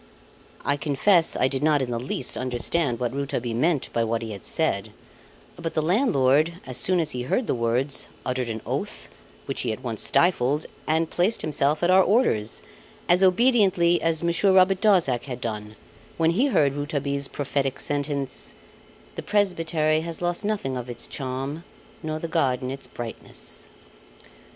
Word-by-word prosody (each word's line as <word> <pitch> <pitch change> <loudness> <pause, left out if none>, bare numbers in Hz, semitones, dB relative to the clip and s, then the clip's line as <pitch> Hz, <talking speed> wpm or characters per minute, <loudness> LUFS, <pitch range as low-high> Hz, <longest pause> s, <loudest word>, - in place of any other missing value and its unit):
I 145 - +1
confess 165 +5 +3
I 130 - +2
did 135 0 -3
not 150 -1 +3
in 130 -2 -2
the 115 - -2
least 125 +1 -2
understand 130 +1 -1
what 125 -1 -2
Rouletabille 135 -4 -3
meant 150 +3 0
by 115 - +1
what 115 0 -1
he 110 - -6
had 100 -2 -8
said; - - 0 0.7
but 165 -1 -5
the 155 - +2
landlord, 160 - +3
as 130 -2 -3
soon 185 -1 +3
as 160 -3 +1
he 125 - -3
heard 225 - 0
the - - 0
words, 125 +3 0 0.2
uttered 125 -1 -2
an 110 -1 -4
oath, - - -4 0.4
which - - -3
he - - -1
at 110 +4 -6
once 115 -4 -3
stifled, 150 -4 +2 0.2
and 160 +1 +1
placed 190 +6 +1
himself 150 +1 0
at 175 - +4
our 190 +1 +7
orders 185 - +1 0.4
as 175 +2 +4
obediently 190 -4 +4
as 165 0 0
Monsieur 170 +4 +2
Robert 190 0 +4
Darzac 175 - +3
had 125 -3 -6
done, 105 -3 -5 0.4
when 165 0 +3
he 240 +11 +2
heard 145 - +2
Rouletabille's 140 -1 -2
prophetic 140 -1 -2
sentence 140 - -3 0.6
"The - - -5
presbytery 165 -6 +1
has 165 -1 -5
lost 175 +1 -1
nothing 200 -12 -2
of 125 0 -6
its 120 -1 -2
charm, 135 +4 -5 0.4
nor 155 -2 -3
the 165 - -4
garden 130 -6 0
its 135 0 -6
brightness." 120 -2 -9
145 Hz, 165 wpm, -24 LUFS, 130-170 Hz, 0.7 s, our